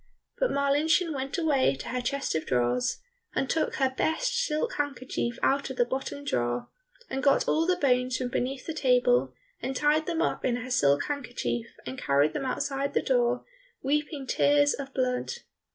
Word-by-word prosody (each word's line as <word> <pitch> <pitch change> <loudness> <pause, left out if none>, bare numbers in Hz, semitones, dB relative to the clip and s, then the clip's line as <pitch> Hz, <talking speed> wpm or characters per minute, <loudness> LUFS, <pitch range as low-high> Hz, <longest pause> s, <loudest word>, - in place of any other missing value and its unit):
But - - +2
Marlinchen 300 +4 +2
went 270 0 -3
away 285 - +2
to 135 - -7
her 250 +1 -1
chest 275 +3 -1
of 160 - -2
drawers, 125 0 +1 0.3
and 270 - +1
took 320 +4 0
her 265 -2 +1
best - - 0
silk 475 0 0
handkerchief 255 -4 -2
out 275 +1 +2
of 265 - -6
the 245 - +4
bottom 270 +3 -4
drawer, 120 - -1 0.4
and 270 - -3
got 275 0 +3
all 325 +2 +2
the 365 - +3
bones 255 -5 +2
from 255 -1 -2
beneath 255 +2 -2
the 325 - -3
table, 245 - +3 0.3
and 265 +2 -3
tied 300 +3 +2
them 335 -2 -1
up - - -1
in 245 - +1
her 250 +1 -5
silk 140 - +3
handkerchief, 240 - -3 0.2
and 130 +1 -6
carried 140 +2 +3
them 275 - -3
outside 275 +1 -2
the - - +3
door, 245 -1 +1 0.4
weeping 290 0 -1
tears 290 +2 +3
of 275 -1 -6
blood. 255 -1 -1
265 Hz, 180 wpm, -28 LUFS, 245-290 Hz, 0.4 s, the